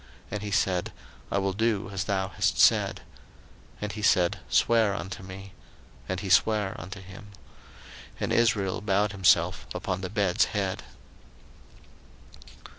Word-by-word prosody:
And 105 - -3
he 105 - -4
said, 95 -3 0 0.4
I - - +1
will 95 -1 0
do 110 -1 0
as 95 -1 -3
thou 95 -2 -1
hast - - 0
said. - - +4 0.7
01:047:031 - - -26
And 105 -1 -3
he 105 - -7
said, 90 -4 +3
Swear 110 -4 +3
unto 95 -1 -6
me. 95 +1 -10 0.6
And 95 -1 -2
he 100 - -5
sware 105 0 +3
unto 95 +4 -8
him. 95 +2 -12 0.9
And - - -1
Israel 105 -5 +2
bowed 100 0 +1
himself 90 -3 +2
upon 95 0 -3
the 95 - -4
bed's 100 -3 +2
head. 100 -3 -2
95 Hz, 140 wpm, -27 LUFS, 95-105 Hz, 0.9 s, said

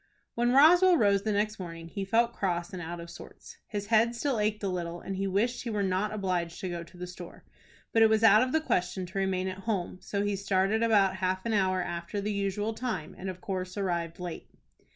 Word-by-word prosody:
When 240 +1 +1
Roswell 345 +7 +7
rose 200 -5 +3
the 215 - -1
next 210 +1 0
morning 165 -2 -7
he 195 +4 -5
felt 235 +4 +2
cross 175 -3 -2
and 185 - -5
out 170 +1 -6
of 170 - -8
sorts. - - -12
His 205 -2 -4
head 230 +2 +3
still 255 -1 -1
ached 210 0 0
a - - 0
little, 175 -2 -3
and 195 - -5
he 195 +1 -1
wished 215 +6 0
he 240 - -5
were 210 -2 -1
not 190 +2 0
obliged 180 -5 -2
to 185 - -3
go 170 -1 -4
to 170 +2 -16
the 180 - -5
store. 180 -1 -10 0.5
But 225 - +4
it 225 - +7
was 220 0 +2
out 215 -1 +7
of 255 0 +1
the 315 - +2
question 180 - -1
to 185 +2 -5
remain 190 -1 0
at 185 0 -5
home, 185 -3 -2
so 200 0 -2
he 205 -1 0
started 195 +2 +1
about 200 -5 +3
half 185 +1 -1
an 230 - 0
hour 185 -3 +2
after 170 +4 -4
the 205 +1 -2
usual 200 +2 -1
time, 220 -9 -4
and 190 - -6
of 185 -1 -7
course 185 -1 -4
arrived 170 -4 -2
late. 175 -2 -6
195 Hz, 235 wpm, -29 LUFS, 180-215 Hz, 0.5 s, Roswell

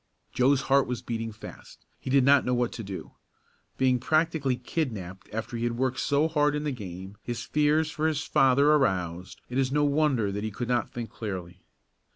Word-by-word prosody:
Joe's 130 +2 +3
heart 135 +1 +3
was 125 -2 -4
beating 115 -1 -3
fast. 105 - -12
He - - -7
did 135 0 +4
not 140 +1 +5
know 125 - 0
what 120 -1 0
to 115 - -6
do. 95 -2 -7 0.7
Being 130 -1 +3
practically 155 -1 +1
kidnapped 110 - -4
after 115 +2 -4
he 115 - -3
had 120 0 -1
worked 130 0 0
so 145 +2 +2
hard 150 -2 +2
in 150 - -2
the 150 - -1
game, 95 -4 -8
his 120 -1 -4
fears 150 +1 +2
for 155 +1 0
his 155 -1 -1
father 140 +1 +4
aroused, 90 - 0
it 125 +2 -2
is 130 -1 +1
no 150 +1 +2
wonder 140 -8 +2
that 105 +1 -4
he 110 - -1
could 120 +3 -5
not 120 -1 +1
think 120 -2 -6
clearly. 95 -4 -6
125 Hz, 195 wpm, -27 LUFS, 110-145 Hz, 0.7 s, not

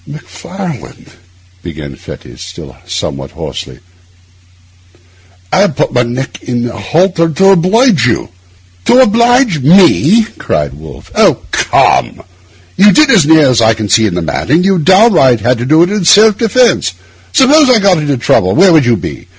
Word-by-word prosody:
'Macfarlane,' 165 - -10 0.5
began 75 -6 -9
Fettes, - - -13
still - - -11
somewhat 70 0 -6
hoarsely, 65 -2 -9 1.7
'I - - +2
have - - 0
put - - -2
my 125 - +1
neck 125 +3 -6
in 120 -1 -3
a - - -10
halter 165 - -1
to 195 +5 +2
oblige 190 - +1
you.' 115 - -3 0.6
'To - - +3
oblige 235 - +2
me?' 180 - +3 0.2
cried 75 -3 -3
Wolfe. 75 0 -14
'Oh, - - +1
come! - - 0 0.5
You 205 +2 +5
did, 300 +4 +3
as 185 -10 +3
near 160 -2 +4
as 125 -3 +1
I 110 0 +2
can 110 -2 -6
see 110 0 +2
the 90 -1 -4
matter, 95 - -2
what 180 +3 0
you 195 -2 +1
downright 175 - +3
had 125 +1 -1
to 120 - -4
do 155 +4 +3
in 200 +2 -2
self 210 +5 +4
defence. 230 - 0 0.4
Suppose 285 +2 +3
I 250 - +4
got 195 -5 +1
into 145 -3 -2
trouble, 95 -5 0
where 185 +1 +4
would 155 -5 +3
you 120 -2 +1
be? - - -9
160 Hz, 160 wpm, -10 LUFS, -, 1.7 s, You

